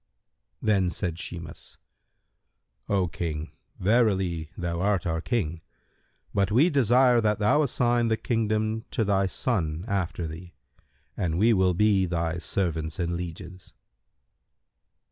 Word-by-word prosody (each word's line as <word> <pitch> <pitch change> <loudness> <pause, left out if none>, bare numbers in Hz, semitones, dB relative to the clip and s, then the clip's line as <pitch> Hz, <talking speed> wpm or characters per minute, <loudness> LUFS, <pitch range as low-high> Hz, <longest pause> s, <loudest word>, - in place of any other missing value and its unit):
Then 100 -4 +2
said 90 -2 -3
Shimas, 85 -3 -8 1.1
"O 95 -3 +2
King, 80 -2 -4 0.3
verily 95 -7 +1
thou 85 -1 -2
art 100 -3 +1
our 80 -1 -1
King, 85 -8 -2 0.7
but 100 0 +1
we 145 +11 +4
desire 125 -2 +4
that 105 -2 +1
thou 105 +9 +3
assign 120 -4 +1
the 110 -1 +1
kingdom 110 -1 -1
to 115 - 0
thy 100 -1 +2
son 85 -5 -2
after 95 -5 -2
thee, 80 +2 -9 0.6
and 80 -2 -1
we 115 +5 +4
will 95 -3 +2
be 100 -1 +3
thy 85 -1 -2
servants 80 0 -2
and 85 -1 -1
lieges." 90 +1 -7
95 Hz, 125 wpm, -26 LUFS, 85-110 Hz, 1.1 s, we